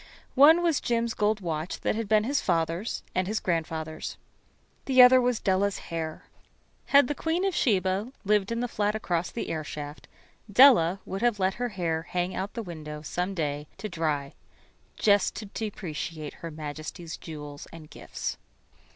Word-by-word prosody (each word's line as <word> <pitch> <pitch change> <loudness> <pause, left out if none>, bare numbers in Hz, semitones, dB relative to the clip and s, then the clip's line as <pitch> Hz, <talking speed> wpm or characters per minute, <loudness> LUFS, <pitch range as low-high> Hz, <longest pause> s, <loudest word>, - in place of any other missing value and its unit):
One 315 +6 +7
was 330 -4 +2
Jim's 235 -1 0
gold 210 0 +1
watch 165 -1 -3
that - - +1
had 220 -1 -3
been 215 -1 +4
his 275 +5 0
father's 170 +4 -1
and 185 0 0
his 215 +2 -1
grandfather's. 160 -2 -3 0.7
The 260 -1 +2
other 255 +1 +9
was 245 -2 +1
Della's 195 +1 +1
hair. 160 -2 -5 0.6
Had 280 -2 +6
the 295 - -1
Queen 325 +5 -1
of 390 - +1
Sheba[13 205 - +2 0.2
1] 255 - -13
lived 210 0 +2
in 230 0 -1
the 245 - 0
flat 210 -2 -1
across 175 -5 -1
the 235 - -4
airshaft, 150 -1 -6 0.4
Della 200 -7 +6
would 195 +2 -5
have 240 -3 +2
let 190 -1 +1
her 245 - 0
hair 170 -5 -1
hang 180 +2 -2
out 195 +2 -4
the 230 - -3
window 150 -4 -7
some 180 +5 -3
day 150 -3 -2
to 215 - -5
dry 155 -6 -2 0.6
just 205 -2 +3
to 215 - -6
depreciate 165 -7 -5
Her 165 - -8
Majesty's 155 +2 -7
jewels 150 -3 -9
and 165 -2 -11
gifts. - - -5
190 Hz, 170 wpm, -27 LUFS, 160-225 Hz, 0.7 s, other